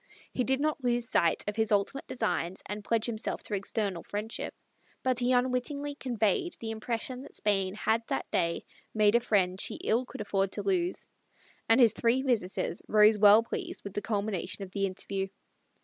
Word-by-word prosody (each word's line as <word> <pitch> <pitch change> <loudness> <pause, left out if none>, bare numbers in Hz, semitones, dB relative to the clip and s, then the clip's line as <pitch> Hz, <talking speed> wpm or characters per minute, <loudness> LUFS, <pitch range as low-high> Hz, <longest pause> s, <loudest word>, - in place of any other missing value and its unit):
He 250 - +1
did 265 +2 +1
not 300 -2 -1
lose 240 -1 +1
sight 170 -6 +2
of 210 - -2
his 220 -1 +1
ultimate 205 +7 +1
designs 190 -7 -2
and 205 +1 -5
pledge 225 +1 +1
himself 230 -1 -3
to - - -6
external 200 -2 -1
friendship, 210 +2 -5 0.5
but 255 -1 +1
he 245 0 +3
unwittingly 255 +3 +1
conveyed 250 - 0
the 225 -1 -4
impression 230 +3 -4
that 280 - -11
Spain 195 -2 +1
had 220 +1 +1
that - - -2
day 170 0 0 0.3
made 210 -1 +4
a 235 - +6
friend 190 -5 +1
she - - -2
ill 245 +3 0
could - - -7
afford 195 -2 0
to - - -2
lose; 365 -2 0 0.6
and 225 - +6
his 230 -4 +6
three 240 +3 +2
visitors 210 -8 -1
rose 215 0 +5
well 210 +2 +8
pleased 355 - -5
with 200 - -7
the 205 - -2
culmination 200 -2 -2
of 190 - -9
the 195 0 0
interview. 195 +1 -3
220 Hz, 180 wpm, -30 LUFS, 200-250 Hz, 0.6 s, well